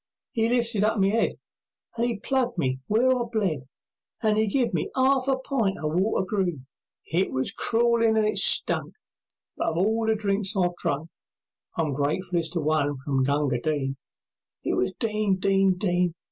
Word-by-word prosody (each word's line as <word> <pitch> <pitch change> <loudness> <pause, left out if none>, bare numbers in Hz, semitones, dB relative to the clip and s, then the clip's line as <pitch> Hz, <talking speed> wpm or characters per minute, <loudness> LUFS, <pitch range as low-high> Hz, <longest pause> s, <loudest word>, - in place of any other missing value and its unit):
'E 225 0 +2
lifted 235 -4 +1
up 215 +1 +1
my 195 0 +3
head, 220 +2 +1 0.6
And 235 +1 0
'e 235 -3 -2
plugged 245 0 -1
me 130 -5 0
where 240 +5 +3
I 250 - -1
bled, 180 - -1 0.6
And 215 -1 +3
'e 215 0 +2
gave 240 +2 0
me 160 - -1
'arf 265 0 +2
a 270 -1 +2
pint 245 -7 -1
o' - - -5
water 190 +4 +1
green; 175 -10 -2 0.5
It 185 +3 +1
was 130 0 0
crawlin' 230 -1 +2
and 215 - +3
it 215 - +1
stunk, - - +2 0.6
But - - -1
of 160 - -1
all 220 +5 +1
the 220 - +3
drinks 200 -1 0
I've 175 -2 +1
drunk, 150 +4 -3 0.7
I'm 155 -3 0
gratefullest 165 +4 -1
to 170 - -1
one 150 -1 +1
from 135 0 -1
Gunga 140 -2 +1
Din. 140 -3 -1 0.7
It - - -1
was 125 - +1
"Din! 215 -1 0
Din! 195 0 +2
Din! 180 -3 0
195 Hz, 175 wpm, -25 LUFS, 155-225 Hz, 0.7 s, my